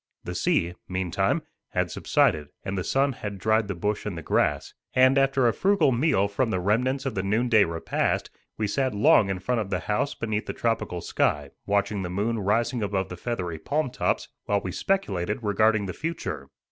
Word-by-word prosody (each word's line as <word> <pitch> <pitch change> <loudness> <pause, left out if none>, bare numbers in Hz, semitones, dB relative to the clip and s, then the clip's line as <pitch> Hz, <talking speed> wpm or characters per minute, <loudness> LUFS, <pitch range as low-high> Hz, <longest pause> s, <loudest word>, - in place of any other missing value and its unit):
The - - -5
sea, 85 +1 +1 0.2
meantime, 95 -2 0 0.3
had - - 0
subsided 75 -1 +2 0.2
and 95 - -2
the 95 - -2
sun 135 +6 +2
had 105 -5 -6
dried 110 +2 +2
the 100 - -3
bush 105 +4 -2
and 100 -5 -4
the 80 - -6
grass; - - 0 0.2
and 130 +1 +6
after 135 -2 +3
a 115 - +3
frugal 195 -7 +3
meal 120 -6 +2
from 115 +4 0
the 95 - 0
remnants 125 +8 +1
of 135 - -1
the 95 - -1
noonday 110 +2 +3
repast, 85 0 -1 0.3
we 110 - 0
sat 130 +3 0
long 105 0 +5
in 95 - -1
front 115 +6 -1
of 100 - -5
the - - -1
house 105 +7 -1
beneath 110 -2 -2
the - - -3
tropical 115 -6 -1
sky, 75 -3 0 0.2
watching 100 0 +1
the 90 - -4
moon 105 +5 -1
rising 115 +4 +1
above 95 -2 -1
the 90 - -6
feathery 90 -5 -4
palm 145 - -1
tops, - - -1 0.2
while 100 -1 +1
we 90 - -4
speculated 105 - -1
regarding 105 0 +2
the 90 - -4
future. 80 - -4
105 Hz, 195 wpm, -26 LUFS, 95-120 Hz, 0.3 s, and